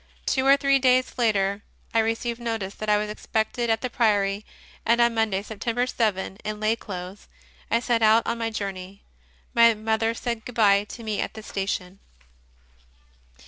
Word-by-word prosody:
Two 265 0 +1
or 275 +1 +7
three 275 -1 +3
days 255 -1 +2
later 200 -3 +1 0.3
I 230 - +3
received 225 +1 -1
notice 225 -4 -3
that 215 - -5
I 210 - +5
was 210 0 -2
expected 220 +2 -2
at 225 0 +1
the 255 - -2
Priory, 205 -3 +1 0.4
and 235 +1 +3
on 235 0 +4
Monday, 215 -4 0
September 230 +3 -2
7, 205 -6 -1
in 210 0 -5
lay 215 +1 +2
clothes, 185 -2 -8 0.4
I 230 - +3
set 240 -2 +1
out 220 +1 +5
on 235 - -2
my 225 0 -1
journey. 195 -2 -6 0.5
My 230 -1 +6
mother 220 +1 0
said 235 -2 -3
good 250 - -9
bye 205 -2 +4
to 230 +2 -10
me 215 -2 -2
at - - -4
the 220 - -8
station. 195 -2 -4
220 Hz, 175 wpm, -25 LUFS, 205-235 Hz, 0.5 s, or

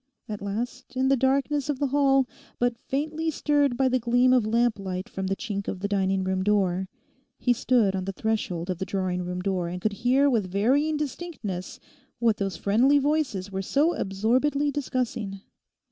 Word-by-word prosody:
At 210 -2 -5
last, 240 +6 -5
in 260 +1 +2
the 275 - +5
darkness 275 +2 +1
of 290 - 0
the 285 - 0
hall, 270 -1 +3 0.3
but 245 -1 +1
faintly 310 +4 -1
stirred 290 -4 +1
by 265 0 +3
the 255 0 +2
gleam 245 +2 +3
of 245 -4 +3
lamplight 205 -5 0
from 190 0 -4
the 195 - 0
chink 200 -2 -4
of 190 - -3
the 205 - -2
dining 195 -1 +1
room 185 0 -1
door, 190 -2 +1 0.5
he 245 - +2
stood 235 -5 +2
on 185 -1 -2
the 195 - -2
threshold 190 -4 -2
of 180 - -4
the - - -1
drawing 185 -2 -2
room 180 0 -4
door 185 -3 -1
and 180 +1 -4
could 215 +3 -1
hear 250 +6 +3
with 220 -9 +1
varying 275 +10 +2
distinctness 270 - -5 0.4
what 230 -3 +2
those 195 -3 -2
friendly 245 +8 +3
voices 280 -10 0
were 190 0 -2
so 290 - +2
absorbedly 255 +9 +1
discussing. 245 -8 -3
230 Hz, 180 wpm, -26 LUFS, 195-270 Hz, 0.5 s, the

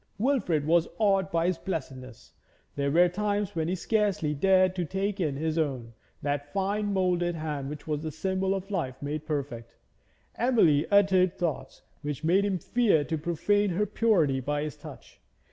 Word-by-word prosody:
Wilfrid 200 - +1
was 165 +1 +3
awed 195 -3 +2
by 165 -1 +1
his 180 -1 0
blessedness. 130 - -6 0.4
There 140 0 0
were 175 +5 +5
times 205 +1 -2
when 160 -1 -1
he 180 - 0
scarcely 200 -6 0
dared 185 +4 +3
to 180 - 0
take 195 +4 -2
in 155 -6 0
his 160 +3 -1
own 130 -7 -2 0.3
that 145 0 -2
fine 205 +3 -1
moulded 180 -2 +1
hand 150 -4 -4
which 150 0 -8
was 150 -2 -2
the 160 - -4
symbol 190 +4 -1
of 195 +1 -6
life 135 -10 -3
made 150 +2 -5
perfect; 130 -6 -4 0.6
Emily 195 - +3
uttered 190 -3 +4
thoughts 170 -5 -4 0.2
which 150 0 -5
made 180 +5 +3
him 195 -2 0
fear 200 -3 +2
to 160 +3 -3
profane 175 +6 +1
her 190 +4 0
purity 175 -14 +2
by 145 +3 -2
his 150 - -5
touch. - - -13
170 Hz, 170 wpm, -28 LUFS, 150-195 Hz, 0.6 s, were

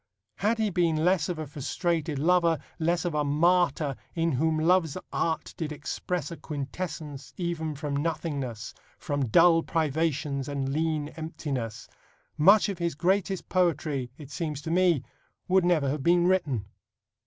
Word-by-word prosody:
Had 220 +3 +1
he 215 -2 0
been 165 -3 +1
less 180 -3 +2
of 175 - -2
a 155 - -4
frustrated 155 +2 -2
lover, 170 +2 +3 0.2
less 170 +2 +1
of 175 - -1
a 150 -1 +1
martyr, 155 -1 +2 0.2
in 165 -1 +1
whom 155 +4 +1
love's 165 0 +2 0.2
Art 160 -1 -1
did 155 -2 -3
express 150 +2 -3
A 170 - -6
quintessence 145 -2 -6
even 165 -3 -2
from 145 0 -3
nothingness, 140 -7 -3 0.2
From 145 -2 -1
dull 165 +7 +6
privations 150 -3 -1
and 140 -1 -2
lean 155 0 -1
emptiness, 135 -9 -5 0.5
much 195 +9 +6
of 195 -3 -4
his 170 -3 -1
greatest 190 +3 0
poetry, 155 -7 0
it 145 -2 -11
seems 155 -4 -3
to 160 - -3
me, 175 -5 +3 0.4
would 185 0 +4
never 165 -5 +3
have 145 +1 -2
been 175 +3 +4
written. 150 - +1
160 Hz, 150 wpm, -27 LUFS, 145-175 Hz, 0.5 s, dull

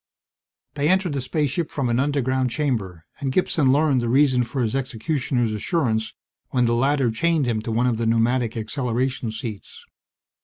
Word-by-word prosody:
They 145 +1 0
entered 185 -3 +2
the 140 - -2
spaceship 150 +4 -1
from 140 -4 -2
an 120 +1 +1
underground 130 -2 +1
chamber, 110 - -2
and 135 -1 -2
Gibson 145 -3 +2
learned 145 -2 +3
the 120 - -1
reason 130 -1 +4
for 125 +2 -2
his 110 +2 -1
executioner's 125 -2 -1
assurance 110 - -1 0.3
when 125 -2 +2
the 115 - +2
latter 135 0 +2
chained 160 +5 +1
him 115 -3 -1
to 115 - -4
one 120 +3 +1
of 120 -3 +1
the 115 0 -1
pneumatic 115 +1 +1
acceleration 125 +1 -2
seats. 110 -2 -7
125 Hz, 165 wpm, -23 LUFS, 115-140 Hz, 0.3 s, reason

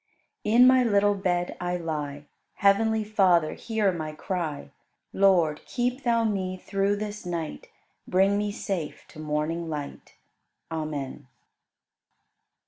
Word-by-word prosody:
23. 210 - -2
In - - +8
my 255 0 +6
little 205 -3 +3
bed 180 -3 -1
I 180 0 -1
lie: 150 -4 -4 0.3
Heavenly 220 +2 +3
Father, 185 -7 +3
hear 220 -4 0
my 155 -3 -5
cry; 155 -4 -4 0.4
Lord, 175 -6 +3
keep 250 +1 -1
Thou 235 -2 +2
me 190 -4 -1
through 195 +2 0
this 210 0 -5
night. 170 -3 -5 0.4
Bring 195 +2 +3
me 205 0 0
safe 190 -6 -4
to - - -13
morning 155 +2 -2
light. 145 -2 -6 0.6
Amen. 150 -4 -4
185 Hz, 125 wpm, -26 LUFS, 155-205 Hz, 0.6 s, In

